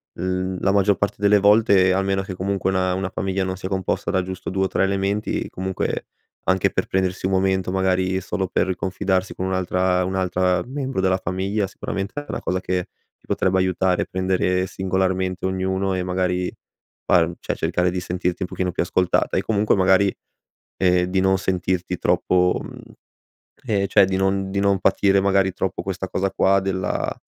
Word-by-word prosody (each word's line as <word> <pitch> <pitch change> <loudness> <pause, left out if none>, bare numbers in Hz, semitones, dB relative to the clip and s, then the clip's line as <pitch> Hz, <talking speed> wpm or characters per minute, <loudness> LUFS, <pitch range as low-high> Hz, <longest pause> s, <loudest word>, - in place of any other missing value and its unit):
l 90 +1 -2 0.2
la 100 - +2
maggior 100 0 +3
parte 100 - -1
delle 105 0 +4
volte, 100 -2 +5
almeno 95 0 0
che 95 -1 -6
comunque 95 0 -1
una 95 -1 +1
una 95 0 -2
famiglia 95 0 -2
non 95 0 -3
sia 95 0 -5
composta 95 -2 -1
da 95 - +1
giusto 95 0 -6
2 95 0 +1
o - - +1
3 - - 0
elementi, 100 +2 -1
comunque, 95 0 -3 0.4
anche 95 -1 +2
per - - -1
prendersi 95 -1 -1
un 95 - 0
momento 95 -1 +1
magari 95 0 +1
solo 95 0 -2
per 95 0 0
confidarsi 95 0 -1
con 95 - -4
un'altra 90 0 +1
un'altra 90 -1 0
membro 135 -5 -3
della 95 0 +2
famiglia, 95 +3 -2
sicuramente 100 0 -5
è - - -15
una - - -4
cosa 90 0 -1
che 90 -1 -2 0.3
ti - - -28
potrebbe 95 0 +1
aiutare. 95 0 +1
Prendere 95 0 0
singolarmente 95 0 -1
ognuno 95 0 -1
e, 90 - -1
magari, 90 0 -1 0.5
far 85 -1 +3
cioè - - -3
cercare 90 0 0
di 90 +1 -2
sentirti 90 +1 -2
un - - -3
pochino 90 -1 -2
più 85 - -1
ascoltata 90 0 +1
e - - +2
comunque, 105 -1 +1
magari, 95 0 +3 0.6
ehm, 90 -1 +2
di 95 +1 -1
non 95 0 +3
sentirti 90 -1 -1
troppo 90 0 +2
mhmm, - - -10 0.9
ehm, 100 -4 0
cioè 100 -1 +5
di 95 - -2
non 95 0 0
di 100 - -1
non 100 -1 +2
patire, 100 +1 +3
magari 95 0 +2
troppo, 95 +1 -3
questa 95 0 -4
cosa 95 +1 -1
qua 95 0 +3
della 95 -1 -2
95 Hz, 180 wpm, -22 LUFS, 90-95 Hz, 0.9 s, volte